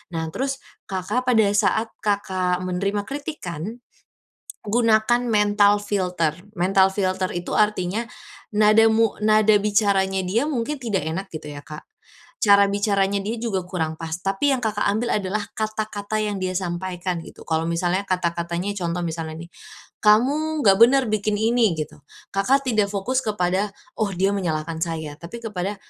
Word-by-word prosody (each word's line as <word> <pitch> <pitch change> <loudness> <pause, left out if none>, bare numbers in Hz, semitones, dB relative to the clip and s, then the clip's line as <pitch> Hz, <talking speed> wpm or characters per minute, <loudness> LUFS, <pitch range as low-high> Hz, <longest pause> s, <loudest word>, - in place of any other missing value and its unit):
Nah, 160 0 -2
terus 270 +4 -3 0.3
Kakak, 200 +6 -2
pada 225 -3 +5
saat 220 +2 +1
Kakak 185 -3 0
menerima 195 +3 -1
kritikan, 240 - -6 0.9
gunakan 230 +1 +3
mental 205 -2 +3
filter. 180 -6 -1 0.2
Mental 190 +1 +3
filter 185 -1 -1
itu 175 0 -3
artinya 210 0 +1 0.5
nada 215 +1 +5
mu 225 -1 +2
nada 215 0 +5
bicaranya 200 -2 +2
dia 215 +8 +1
mungkin 255 +3 -1
tidak 225 -7 -1
enak 190 +5 -3
gitu 150 -1 -7
ya, 145 - -8
Kak, 150 0 -9 0.6
cara 200 -1 +6
bicaranya 200 -1 +1
dia 225 +3 -3
juga 195 -6 -1
kurang 160 -4 -2
pas, 165 0 -4
tapi 195 +9 +1
yang, 260 - 0
Kakak 210 -1 0
ambil 225 +3 0
adalah 205 +2 -2
kata-kata 215 -1 -3
yang 205 -2 -2
dia 185 - -1
sampaikan 180 -1 -3
gitu. - - -13
Kalau 160 0 0
misalnya 175 +3 0
kata-katanya, 175 +1 -1
contoh 175 -1 -2
misalnya 160 -1 -5
nih, - - -38 0.5
"Kamu 285 +9 +3
enggak 195 -2 +6
bener 265 +3 +7
bikin 210 0 0
ini", 225 -4 +2
gitu. 150 -1 -6 0.3
Kakak 265 +8 +2
tidak 215 -4 +2
fokus 240 +7 0
kepada 195 -1 0 0.3
"Oh 215 - +2
dia 195 +2 +2
menyalahkan 160 -3 -2
saya", 160 -3 -3
tapi 175 +8 -8
kepada 200 -2 -3
200 Hz, 150 wpm, -23 LUFS, 180-220 Hz, 0.9 s, bener